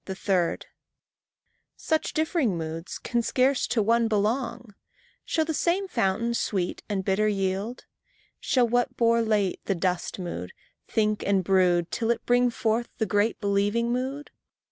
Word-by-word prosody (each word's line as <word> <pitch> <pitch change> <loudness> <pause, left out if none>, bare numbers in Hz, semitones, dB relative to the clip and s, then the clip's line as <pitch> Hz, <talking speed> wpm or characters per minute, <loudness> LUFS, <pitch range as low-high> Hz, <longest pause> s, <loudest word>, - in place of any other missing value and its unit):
3. 190 -2 0 1.2
Such 315 -1 -1
differing 310 - +1
moods 165 +1 -5
can 240 -1 -1
scarce 255 +3 +1
to 225 -3 +1
one 230 +2 +3
belong; 225 +1 -1 0.5
Shall 320 - 0
the 320 - -2
same 360 +5 0
fountain 230 - 0
sweet 190 -6 -2
and 195 -2 -2
bitter 205 +2 +2
yield? 200 +3 -2 0.5
Shall 250 -2 +2
what 245 +2 0
bore 230 0 +3
late 210 -4 0
the 195 - 0
dust 180 0 -1
mood, 170 - -6 0.3
think 215 -1 0
and 195 -2 +2
brood 180 -2 +2
Till 225 - -1
it 235 - 0
bring 245 0 +3
forth 230 0 -1
the 220 - 0
great 205 +3 +1
believing 205 +3 +1
mood? 265 +4 -3
220 Hz, 145 wpm, -26 LUFS, 195-245 Hz, 1.2 s, one